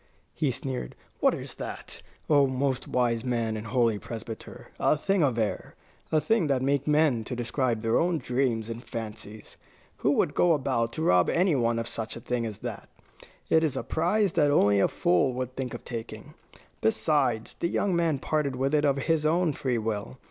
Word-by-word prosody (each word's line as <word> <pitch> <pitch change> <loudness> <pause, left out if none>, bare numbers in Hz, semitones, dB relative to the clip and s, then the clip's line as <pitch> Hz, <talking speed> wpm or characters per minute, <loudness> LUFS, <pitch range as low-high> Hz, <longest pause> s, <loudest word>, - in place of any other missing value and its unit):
he 150 - 0
sneered. 130 - -4 0.2
"What - - +3
is - - -7
that, - - -7 0.3
O 145 -2 +5
most 130 0 -1
wise 120 -2 +1
man 115 -3 -1
and 110 +1 -6
holy 115 -2 +2
Presbyter? 115 +3 -8
A 155 - +3
thing 195 +4 +1
of 130 -6 +2
air, 110 -2 -2 0.4
a 155 - +4
thing 220 -1 +1
that 135 -2 +1
men 140 0 +2
make 150 -7 +3
to 125 - -4
describe 120 -1 -1
their 115 0 +2
own 175 0 +1
dreams 125 -5 -1
and 115 +1 -6
fancies. 110 -2 -8 0.4
Who - - +1
would - - +1
go 175 -1 +4
about 115 -5 0
to 160 - -3
rob 90 - +4
any 175 -2 +2
one 115 -2 +1
of 115 0 -2
such 110 -1 -4
a - - -6
thing 120 0 -2
as 105 -2 -6
that? - - -6 0.6
It 160 0 +4
is 155 -4 0
a - - -2
prize 190 +4 +1
that 150 -3 +3
only 100 -8 +4
a - - +4
fool 90 +9 +2
would 130 0 -4
think 130 -3 -4
of - - -10
taking. 115 -2 -7 0.5
Besides, 115 -1 +1
the - - +1
young 190 +1 0
man 165 -4 +1
parted 140 -1 -1
with 135 +3 -1
it 150 0 +3
of 140 -1 +2
his 160 +2 +1
own 165 +1 +2
free 130 -4 -1
will. 110 +2 -3
130 Hz, 195 wpm, -27 LUFS, 115-150 Hz, 0.6 s, O